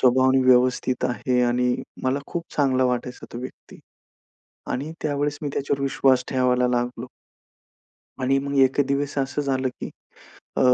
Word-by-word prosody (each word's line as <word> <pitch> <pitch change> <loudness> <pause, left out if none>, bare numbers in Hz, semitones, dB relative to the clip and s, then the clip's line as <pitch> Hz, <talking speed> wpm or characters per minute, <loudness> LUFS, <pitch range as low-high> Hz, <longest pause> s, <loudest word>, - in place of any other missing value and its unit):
स्वभावाने 130 +1 +4
व्यवस्थित 125 0 +3
आहे 125 0 0
आणि 125 0 +2 0.3
मला 130 +2 +1
खूप 170 -1 -4
चांगला 130 -3 +3
वाटायचा 125 0 -2
तो 120 - -5
व्यक्ती 130 - -10 0.9
आणि 145 +5 -3
त्यावेळेस 145 0 -1
मी 145 - -2
त्याच्यावर 140 0 -1
विश्वास 135 -2 +3
ठेवायला 125 -1 +2
लागलो. 125 0 -2 1.1
आणि 135 +2 +2
मग 140 0 -3
एक 135 +2 +4
दिवस 140 +1 -1
असं 135 +2 -1
झालं 130 -2 0
की - - -5 0.7
अ, - - +1
130 Hz, 140 wpm, -24 LUFS, 125-140 Hz, 1.1 s, स्वभावाने